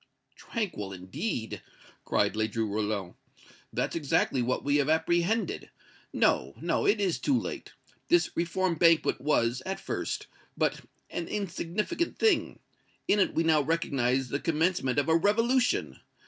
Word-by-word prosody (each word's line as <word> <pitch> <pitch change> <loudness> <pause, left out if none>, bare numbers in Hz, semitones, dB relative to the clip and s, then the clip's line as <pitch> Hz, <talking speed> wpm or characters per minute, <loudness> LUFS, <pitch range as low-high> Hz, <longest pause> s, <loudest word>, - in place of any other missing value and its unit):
"Tranquil, 175 - -4
indeed!" 105 - -4 0.4
cried - - +1
Ledru 110 +1 0
Rollin. 105 -3 -2 0.6
"That's - - -2
exactly 140 -4 +1
what 125 +1 -1
we 145 +1 +2
have 145 0 +1
apprehended! 170 +6 +1 0.4
No 65 +2 +1
no 165 +4 0
it 205 +1 +3
is 190 -4 0
too 265 -3 +2
late! - - -6 0.3
This 345 0 +2
Reform 175 +2 0
Banquet 165 -6 +4
was, 125 -3 +1
at 190 +1 -4
first, - - -3 0.3
but - - 0 0.3
an 170 - -3
insignificant 205 - -2
thing. 445 -2 +2 0.5
In 205 - +3
it 190 - +2
we 165 - +2
now 160 -2 +4
recognize 135 -5 0
the 140 - -1
commencement 160 -5 0
of 145 - +2
a 160 - +4
revolution. 230 +8 +2
165 Hz, 135 wpm, -29 LUFS, 125-195 Hz, 0.6 s, Banquet